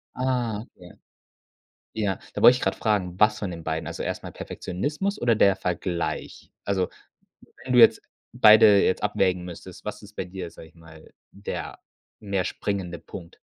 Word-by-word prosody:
Ah, 125 Hz, -4 st, -1 dB
ja. 90 Hz, -1 st, -14 dB, 1.0 s
Ja, 105 Hz, -4 st, -1 dB, 0.2 s
da -, -, -3 dB
wollte 120 Hz, -, +9 dB
ich -, -, -7 dB
grad -, -, 0 dB
fragen, 95 Hz, -5 st, -1 dB
was 105 Hz, +1 st, +4 dB
von 100 Hz, -, -3 dB
den 85 Hz, -2 st, -8 dB
beiden? 80 Hz, 0 st, -3 dB
Also -, -, -5 dB
erst -, -, -4 dB
mal -, -, -7 dB
Perfektionismus 150 Hz, -, -4 dB
oder 120 Hz, -1 st, +3 dB
der 100 Hz, -3 st, +4 dB
Vergleich? 90 Hz, -2 st, -4 dB
Also, 95 Hz, -2 st, 0 dB, 0.8 s
wenn 130 Hz, -, -3 dB
du 125 Hz, -, +6 dB
jetzt -, -, +7 dB, 0.3 s
beide 105 Hz, -4 st, +7 dB
jetzt 95 Hz, -, +1 dB
abwägen 95 Hz, -3 st, +1 dB
müsstest, 90 Hz, +1 st, -10 dB
was 105 Hz, 0 st, -6 dB
ist 105 Hz, +1 st, -14 dB
bei -, -, -3 dB
dir, 90 Hz, -2 st, -7 dB
sage 80 Hz, -, -13 dB
ich 80 Hz, -, -24 dB
mal, 80 Hz, -1 st, -16 dB, 0.2 s
der 100 Hz, +1 st, -6 dB, 0.4 s
mehr 100 Hz, -3 st, -2 dB
springende 95 Hz, -4 st, -3 dB
Punkt? 85 Hz, -3 st, -11 dB
100 Hz, 170 wpm, -25 LUFS, 90-110 Hz, 1.0 s, wollte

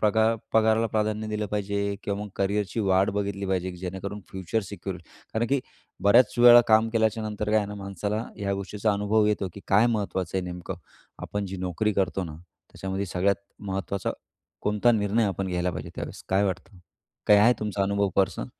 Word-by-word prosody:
प्रगा 110 Hz, +2 st, +3 dB, 0.2 s
पगाराला 110 Hz, 0 st, +4 dB
प्राधान्य 110 Hz, 0 st, -1 dB
दिलं 105 Hz, 0 st, -2 dB
पाहिजे 100 Hz, 0 st, -2 dB, 0.2 s
किंवा 100 Hz, 0 st, -2 dB
मग 105 Hz, -, -6 dB
करियरची 100 Hz, +2 st, 0 dB
वाट 95 Hz, -1 st, +3 dB
बघितली 100 Hz, -1 st, -2 dB
पाहिजे 95 Hz, -1 st, -1 dB
की 90 Hz, -, -10 dB
जेणेकरून 95 Hz, +3 st, -5 dB
फ्युचर 95 Hz, +4 st, -2 dB
सिक्युअर 95 Hz, -1 st, -6 dB
होईल. 85 Hz, -, -15 dB, 0.3 s
कारण 115 Hz, +2 st, +1 dB
की 140 Hz, 0 st, +2 dB, 0.4 s
बऱ्याचं 120 Hz, +3 st, +5 dB
वेळा 120 Hz, 0 st, +10 dB
काम 110 Hz, +1 st, +5 dB
केल्याच्या 110 Hz, -1 st, +1 dB
नंतर 105 Hz, 0 st, -3 dB
काय 110 Hz, -, +4 dB
आहे 105 Hz, -, -1 dB
ना, 105 Hz, -, -6 dB
माणसाला 100 Hz, +2 st, -3 dB
ह्या 100 Hz, -1 st, -1 dB
गोष्टीचा 100 Hz, +2 st, -1 dB
अनुभव 105 Hz, +1 st, +2 dB
येतो 105 Hz, -2 st, 0 dB
की -, -, -9 dB
काय 105 Hz, +4 st, +5 dB
महत्त्वाचं 100 Hz, -6 st, -1 dB
आहे -, -, -2 dB
नेमकं. 90 Hz, -1 st, -6 dB, 0.4 s
आपण 100 Hz, -1 st, -4 dB
जी 95 Hz, +1 st, -6 dB
नोकरी 95 Hz, +4 st, -1 dB
करतो 95 Hz, -1 st, 0 dB
ना, 80 Hz, -2 st, -8 dB, 0.3 s
त्याच्यामध्ये 95 Hz, +1 st, -4 dB
सगळ्यात 95 Hz, +2 st, +1 dB, 0.3 s
महत्त्वाचा 95 Hz, 0 st, -2 dB, 0.5 s
कोणता 105 Hz, +3 st, +3 dB
निर्णय 110 Hz, +1 st, +2 dB
आपण 95 Hz, -1 st, -2 dB
घ्यायला 90 Hz, 0 st, 0 dB
पाहिजे 80 Hz, -, -6 dB
त्यावेळेस. -, -, -6 dB
काय 95 Hz, +2 st, +3 dB
वाटतं? 95 Hz, 0 st, -4 dB, 0.5 s
काय 105 Hz, -, +7 dB
आहे 115 Hz, +4 st, +6 dB
तुमचा 105 Hz, -2 st, -1 dB
अनुभव 100 Hz, 0 st, +1 dB
पर्सनल? 95 Hz, -1 st, +1 dB
100 Hz, 185 wpm, -26 LUFS, 95-110 Hz, 0.5 s, वेळा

